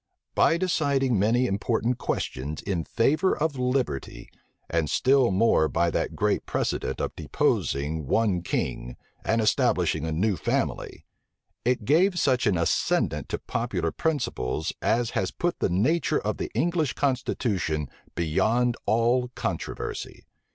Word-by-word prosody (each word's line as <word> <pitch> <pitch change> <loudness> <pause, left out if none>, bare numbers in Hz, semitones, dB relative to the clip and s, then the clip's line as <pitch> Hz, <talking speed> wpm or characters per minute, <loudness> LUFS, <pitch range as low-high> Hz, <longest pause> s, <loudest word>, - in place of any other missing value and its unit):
By 165 - +4
deciding 140 - +1
many 115 +5 +3
important 115 +3 0
questions 70 +4 -3
in 90 -5 -2
favor 155 +11 +2
of 150 -3 -1
liberty, 125 - -2 0.4
and 80 -2 0
still 130 -2 +3
more 95 -5 +3
by 85 0 +1
that - - -2
great - - 0
precedent - - -2
of - - -3
deposing 75 +1 -1
one 100 -3 +2
king, 60 -7 -3 0.3
and 115 - +1
establishing 95 -7 +2
a - - -2
new 95 +5 +1
family, - - -2 0.6
it 120 -3 0
gave 175 - +3
such 130 -8 +2
an 100 -4 +2
ascendant 85 - 0
to - - -1
popular - - -2
principles, 120 - -2
as 115 +1 +1
has 95 - -1
put 175 0 -2
the - - +1
nature 150 - +1
of 105 -1 -2
the - - -3
English 160 +2 +1
constitution 110 - -1 0.3
beyond 110 +9 +1
all 120 +4 +2
controversy. - - -4
115 Hz, 130 wpm, -26 LUFS, 85-135 Hz, 0.6 s, By